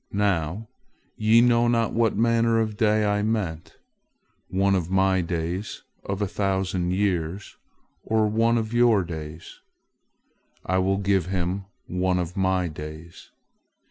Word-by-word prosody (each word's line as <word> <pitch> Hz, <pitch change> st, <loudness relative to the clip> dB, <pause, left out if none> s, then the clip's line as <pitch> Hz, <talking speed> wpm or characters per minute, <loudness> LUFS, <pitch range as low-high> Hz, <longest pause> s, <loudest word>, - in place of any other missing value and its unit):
Now, 100 Hz, 0 st, -1 dB, 0.5 s
ye 110 Hz, +2 st, +4 dB
know 120 Hz, -1 st, +4 dB
not 115 Hz, -1 st, +1 dB
what 115 Hz, -1 st, +1 dB
manner 115 Hz, 0 st, +2 dB
of 110 Hz, -1 st, -1 dB
day 105 Hz, 0 st, +2 dB
I 105 Hz, 0 st, +1 dB
meant—one 100 Hz, -1 st, -4 dB
of 90 Hz, -3 st, -1 dB
My 95 Hz, 0 st, +2 dB
days 85 Hz, +3 st, -4 dB, 0.2 s
of 100 Hz, +1 st, -3 dB
a -, -, 0 dB
thousand 95 Hz, -2 st, -1 dB
years, 95 Hz, -1 st, -2 dB, 0.5 s
or 110 Hz, -1 st, +1 dB
one 115 Hz, +2 st, +2 dB
of 110 Hz, 0 st, -3 dB
your 120 Hz, -5 st, +4 dB
days. 80 Hz, -1 st, -8 dB, 1.1 s
I 95 Hz, +1 st, +1 dB
will 95 Hz, +1 st, +1 dB
give 95 Hz, -2 st, +1 dB
him 95 Hz, +1 st, -2 dB, 0.2 s
one 90 Hz, 0 st, 0 dB
of 90 Hz, -1 st, -3 dB
My 95 Hz, -1 st, +1 dB
days. 80 Hz, +2 st, -10 dB
95 Hz, 130 wpm, -24 LUFS, 90-110 Hz, 1.1 s, ye